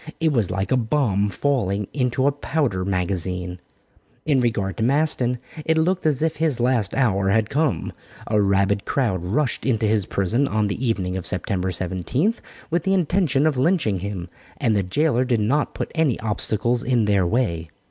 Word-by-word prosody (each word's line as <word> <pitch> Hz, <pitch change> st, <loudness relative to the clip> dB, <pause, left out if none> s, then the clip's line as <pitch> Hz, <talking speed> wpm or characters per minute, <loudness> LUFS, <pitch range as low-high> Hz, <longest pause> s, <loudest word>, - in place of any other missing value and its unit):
It 160 Hz, -1 st, +2 dB
was 115 Hz, -9 st, +1 dB
like 95 Hz, +4 st, -2 dB
a 130 Hz, -, +4 dB
bomb 110 Hz, -5 st, +1 dB
falling 105 Hz, -6 st, -1 dB
into 130 Hz, -1 st, 0 dB
a 140 Hz, -, +4 dB
powder 140 Hz, -9 st, -1 dB
magazine. 90 Hz, -1 st, -2 dB, 0.7 s
In 145 Hz, -4 st, +3 dB
regard 100 Hz, -6 st, -1 dB
to -, -, -1 dB
Maston, 130 Hz, -2 st, +2 dB, 0.3 s
it 160 Hz, +1 st, +1 dB
looked 175 Hz, +1 st, +1 dB
as 150 Hz, -1 st, +1 dB
if 160 Hz, -, 0 dB
his 155 Hz, -5 st, +1 dB
last 120 Hz, -5 st, +1 dB
hour 100 Hz, -7 st, +2 dB
had 110 Hz, +1 st, +1 dB
come. 150 Hz, -3 st, 0 dB, 0.3 s
A 105 Hz, -1 st, +2 dB
rabid 100 Hz, 0 st, +2 dB
crowd 110 Hz, -, 0 dB
rushed 125 Hz, +9 st, -1 dB
into 115 Hz, -4 st, +1 dB
his 105 Hz, -3 st, +1 dB
prison 110 Hz, +9 st, 0 dB
on 110 Hz, -3 st, 0 dB
the 110 Hz, +6 st, -3 dB
evening 95 Hz, -6 st, -1 dB
of 95 Hz, -, -5 dB
Sept. 95 Hz, -1 st, -1 dB
17, 95 Hz, -, -1 dB, 0.4 s
with 170 Hz, +1 st, +1 dB
the 195 Hz, +4 st, +1 dB
intention 170 Hz, -5 st, +2 dB
of 150 Hz, -5 st, +1 dB
lynching 140 Hz, -, +1 dB
him, 95 Hz, -2 st, -5 dB, 0.3 s
and 115 Hz, -6 st, +1 dB
the 100 Hz, -, +2 dB
jailer 125 Hz, -, +1 dB
did 125 Hz, -3 st, +1 dB
not 140 Hz, +8 st, 0 dB
put -, -, -4 dB
any 160 Hz, -7 st, +1 dB
obstacles 115 Hz, +2 st, 0 dB
in 120 Hz, -3 st, +1 dB
their 100 Hz, -3 st, +2 dB
way. 85 Hz, -8 st, -1 dB
115 Hz, 180 wpm, -22 LUFS, 100-145 Hz, 0.7 s, a